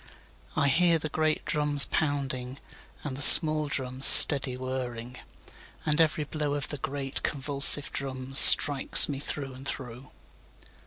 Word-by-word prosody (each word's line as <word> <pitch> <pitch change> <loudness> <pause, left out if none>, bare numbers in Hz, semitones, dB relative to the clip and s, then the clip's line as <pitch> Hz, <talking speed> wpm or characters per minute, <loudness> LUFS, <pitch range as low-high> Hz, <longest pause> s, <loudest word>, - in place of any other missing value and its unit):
4I - - -5
hear 165 +4 -4
the 155 -1 -12
great 155 0 -8
drums 150 -1 -2
pounding, 135 -4 -10 0.5
And 145 -3 -12
the 135 - -14
small 155 +1 +7
drums 130 -1 -4
steady 135 -3 +4
whirring; 125 -2 -13 0.7
And 155 +1 -4
every 155 -1 -6
blow 150 -1 -10
of 145 -1 -12
the 145 - -13
great 135 0 -12
convulsive 140 0 0
drums, 135 0 -3
Strikes 145 -3 +4
me 140 -2 -11
through 140 -1 -12
and 130 +2 -18
through. 125 -1 -14
140 Hz, 140 wpm, -20 LUFS, 130-150 Hz, 0.7 s, small